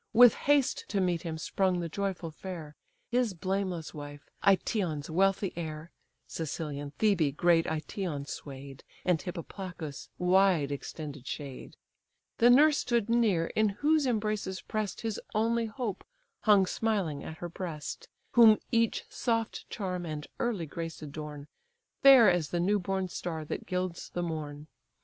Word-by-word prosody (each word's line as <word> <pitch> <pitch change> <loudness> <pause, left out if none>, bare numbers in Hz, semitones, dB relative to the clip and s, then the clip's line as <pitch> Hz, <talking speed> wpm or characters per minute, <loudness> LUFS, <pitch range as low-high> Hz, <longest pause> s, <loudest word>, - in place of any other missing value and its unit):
With 245 -1 +9
haste 285 -2 +2
to 200 - -1
meet 180 -3 +1
him 160 -2 -4
sprung 185 +3 0
the 170 - -2
joyful 180 -1 -3
fair. 160 -3 -8 0.4
His 240 -5 +1
blameless 185 -2 -2
wife, 145 -1 -9 0.2
Aëtion's 180 -6 +1
wealthy 195 +2 +2
heir 160 -1 -6 0.4
(Cilician 150 -3 -4
Thebe 170 -10 +2
great 170 -1 +4
Aëtion 155 -1 -3
sway'd, 135 -1 -8 0.2
And 180 -3 +3
Hippoplacus' 175 -4 -7
wide 180 -5 +3
extended 145 -1 -6
shade): 140 -3 -7 0.6
The 240 - +7
nurse 290 +4 +6
stood 235 -2 0
near, 215 -8 +3
in 215 -1 +3
whose 295 +7 +2
embraces 215 -4 -1
press'd, 215 -3 -3
His 225 -3 -3
only 230 +1 +2
hope 220 -3 -4 0.4
hung 205 -3 +6
smiling 195 -8 -1
at 160 - -7
her 175 - -5
breast, 165 -4 -6 0.2
Whom 225 -3 +8
each 230 -2 +1
soft 230 -2 -2
charm 185 -4 -3
and 150 -2 -5
early 220 -8 -1
grace 165 +1 -6
adorn, 150 -1 -7 0.6
Fair 265 -5 +9
as 175 -5 +2
the 175 - -1
new 200 +4 +2
born 190 0 -1
star 165 -3 -4
that - - -5
gilds 180 -2 -3
the 175 - -3
morn. 150 -3 -5
180 Hz, 140 wpm, -30 LUFS, 155-215 Hz, 0.6 s, With